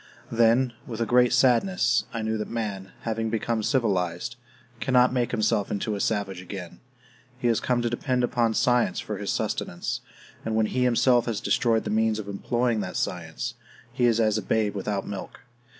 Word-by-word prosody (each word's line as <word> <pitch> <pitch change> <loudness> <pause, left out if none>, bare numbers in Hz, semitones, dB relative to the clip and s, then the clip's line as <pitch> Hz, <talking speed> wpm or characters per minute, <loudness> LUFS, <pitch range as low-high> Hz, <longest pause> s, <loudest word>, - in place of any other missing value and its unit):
Then, 120 +2 +3
with 115 -2 -6
a 115 - +1
great 125 +1 +4
sadness, 125 0 +3
I 115 -2 -3
knew 110 0 -1
that 105 - -4
man, 100 -4 -4
having 115 -1 -2
become 115 0 -1
civilized, 100 - 0 0.4
cannot 125 -1 +3
make 120 -3 +1
himself 110 -2 +1
into 105 +1 -2
a 100 - -3
savage 100 -4 -1
again. 95 -2 -8 0.6
He 125 - -1
has 115 - +2
come 125 -1 0
to 120 - +1
depend 125 +1 0
upon 120 -2 +1
science 120 -6 +2
for 105 -3 -5
his 100 - -2
sustenance, 85 - -2 0.4
and 110 - -2
when 110 -1 +3
he 125 +3 0
himself 125 0 +3
has 110 -4 -1
destroyed 115 -2 +2
the - - -3
means 110 0 +2
of 105 -2 -6
employing 120 +3 0
that 90 -3 -3
science, 90 +8 -3 0.4
he 125 -1 +1
is 115 -1 +2
as 110 -1 +2
a - - -4
babe 105 +1 0
without 100 0 -3
milk. 100 -2 -7
115 Hz, 180 wpm, -26 LUFS, 105-120 Hz, 0.6 s, great